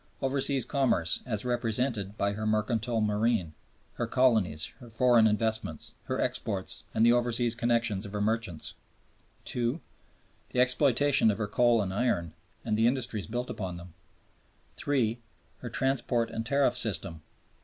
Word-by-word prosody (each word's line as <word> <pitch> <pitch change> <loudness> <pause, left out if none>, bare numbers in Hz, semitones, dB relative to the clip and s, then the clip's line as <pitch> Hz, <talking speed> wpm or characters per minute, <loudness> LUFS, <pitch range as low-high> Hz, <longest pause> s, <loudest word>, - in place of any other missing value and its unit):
Overseas 135 -1 +1
commerce 125 - +1
as 110 -1 -3
represented 115 -3 -1
by 100 0 +1
her 110 +1 -3
mercantile 110 +2 0
marine, 105 -5 0 0.4
her - - -3
colonies, 110 -12 +1
her 120 -3 -12
foreign 115 0 +4
investments, 110 -6 -2
her - - -2
exports, - - -2
and 110 - +2
the 120 - +6
overseas 120 -1 +1
connections 115 -4 0
of 100 -2 -8
her 105 - -2
merchants; 105 -6 -1 0.8
II. 120 +5 0 0.7
The 125 - -2
exploitation 130 0 +3
of 105 - 0
her 105 - -1
coal 115 +1 +3
and 95 -1 -4
iron 90 -8 0 0.3
and 110 -2 0
the 110 +2 +3
industries 120 -5 -1
built 120 +3 -3
upon 90 -3 -5
them; 85 -1 -12 0.9
III. 120 -5 +1 0.4
Her - - -6
transport 130 -3 0
and 115 0 -4
tariff 140 -1 +2
system. 100 -9 0
115 Hz, 145 wpm, -29 LUFS, 105-125 Hz, 0.9 s, the